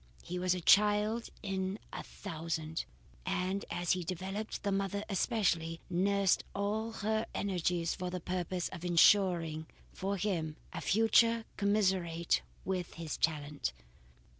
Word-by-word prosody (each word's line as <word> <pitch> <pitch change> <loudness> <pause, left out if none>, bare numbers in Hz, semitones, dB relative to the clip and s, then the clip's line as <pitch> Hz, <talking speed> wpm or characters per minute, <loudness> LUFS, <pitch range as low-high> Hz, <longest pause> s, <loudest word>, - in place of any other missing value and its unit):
He 180 +1 -4
was 180 0 +2
a 180 - -4
child 210 +4 +4
in 190 0 -2 0.2
a - - -4
thousand, 160 -3 -4 0.4
and 190 +1 -1
as 175 0 -1
he 180 -1 +1
developed, 190 +5 -4
the 200 - 0
mother 195 +1 -1
especially, 180 -6 +1
nursed 195 +1 +3
all 210 +3 -1
her 220 +1 +1
energies 175 -3 0
for 180 0 -4
the 180 0 -3
purpose 180 0 -2
of 180 -2 -8
ensuring 170 -3 +4 0.3
for 195 +1 -2
him 170 -6 -1 0.2
a - - -4
future 225 +2 +4
commensurate 190 -5 +2 0.2
with 185 -2 -2
his 165 -3 -4
talents. 145 - -1
185 Hz, 130 wpm, -33 LUFS, 170-200 Hz, 0.4 s, child